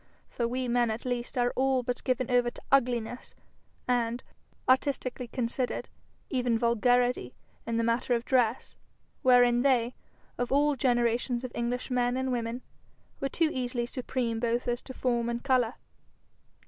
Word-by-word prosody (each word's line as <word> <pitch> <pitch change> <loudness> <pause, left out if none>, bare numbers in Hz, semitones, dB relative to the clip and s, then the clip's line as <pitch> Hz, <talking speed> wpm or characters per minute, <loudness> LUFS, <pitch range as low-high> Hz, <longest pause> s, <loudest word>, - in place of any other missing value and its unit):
For 235 - -1
we 255 +1 -2
men 240 -1 +2
at 220 +3 -4
least 245 +1 -3
are 245 0 +2
all 265 -1 +2
but 245 +1 -3
given 255 -1 0
over 245 -1 +3
to - - -13
ugliness, 245 -3 +1 0.5
and, 240 -1 0 0.4
artistically 255 -1 +1
considered, 245 +1 -2 0.4
even 245 -3 +1
vulgarity, 245 - +2 0.3
in 230 0 0
the 230 - +1
matter 235 +2 +1
of 235 +1 -3
dress, 245 -2 +1 0.5
wherein 245 -2 +5
they, 250 -3 +2 0.5
of 245 0 -1
all 290 +1 +3
generations 240 -1 +1
of 255 - -5
English 245 +2 -2
men 245 0 +1
and 260 0 -1
women, 235 0 -3 0.6
were 275 - -1
too 320 +1 +1
easily 245 -1 -2
supreme 240 -2 -2
both 235 +1 0
as 240 0 0
to 260 - -9
form 240 -2 0
and 235 0 -3
colour. 255 -4 +2
245 Hz, 150 wpm, -29 LUFS, 235-255 Hz, 0.6 s, wherein